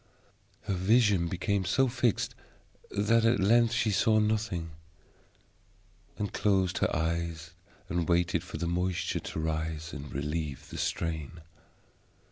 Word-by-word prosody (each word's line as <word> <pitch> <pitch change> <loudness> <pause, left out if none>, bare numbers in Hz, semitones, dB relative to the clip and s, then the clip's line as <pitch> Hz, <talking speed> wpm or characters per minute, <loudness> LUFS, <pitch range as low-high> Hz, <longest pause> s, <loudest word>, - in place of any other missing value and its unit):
Her 105 -3 -2
vision 100 -1 +3
became 95 +3 -1
so 130 +9 +2
fixed 120 -3 0 0.6
that 110 +3 +2
at 115 +2 +3
length 115 +4 +4
she 110 -2 +1
saw 110 +2 +3
nothing, 105 -6 0 1.5
and 105 -1 -3
closed 95 -3 +1
her - - +2
eyes 80 0 -2 0.4
and 85 -3 -1
waited 85 +1 +2
for - - -7
the 85 - -2
moisture 90 +1 -1
to - - -6
rise 80 0 -3
and 75 -1 -7
relieve 75 0 -4
the - - -6
strain. 80 0 -3
90 Hz, 125 wpm, -29 LUFS, 80-105 Hz, 1.5 s, length